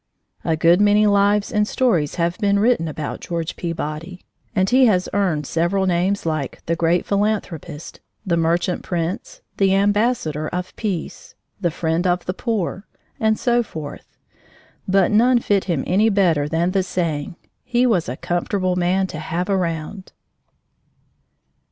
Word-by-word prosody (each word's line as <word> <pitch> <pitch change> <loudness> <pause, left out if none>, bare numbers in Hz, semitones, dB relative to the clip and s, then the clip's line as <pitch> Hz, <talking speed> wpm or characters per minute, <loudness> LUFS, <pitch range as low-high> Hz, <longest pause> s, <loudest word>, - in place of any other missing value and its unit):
A 160 - 0
good 170 +4 +4
many 210 +1 +4
lives 205 +2 +3
and 210 -2 +1
stories 200 - +1
have 170 0 0
been 200 -2 +2
written 215 -5 +2
about 150 -1 -5
George 170 -1 -4
Peabody, 170 +1 -5 0.3
and 190 -1 +2
he 255 +3 +5
has 185 -4 +2
earned 180 -7 0
several 175 +6 0
names 185 +2 0
like 155 -5 -3
The 165 - 0
Great 170 +1 +1
Philanthropist 200 -7 -2 0.3
The 175 -3 +1
Merchant 170 +2 0
Prince 175 +1 -4 0.2
the 195 -1 +3
Ambassador 200 -7 +1
of 180 +2 -5
Peace 195 -7 -5 0.2
the 175 -3 +1
Friend 165 +2 -1
of 180 0 0
the 185 - -2
Poor 205 -2 -3 0.3
and 220 -1 +2
so 240 -1 +2
forth, 155 -10 -9 0.7
but 190 -1 +3
none 240 +4 +4
fit 205 -4 +1
him 165 -8 -1
any 205 +5 +3
better 170 -8 +2
than 170 +3 +1
the 195 0 +2
saying: 170 -5 -2 0.3
"He 245 0 +1
was 195 - +1
a 125 - -4
comfortable 180 +1 -1
man 180 +2 +1
to 155 -4 -6
have 170 +4 -3
round!" 185 0 -2
180 Hz, 150 wpm, -21 LUFS, 165-205 Hz, 0.7 s, he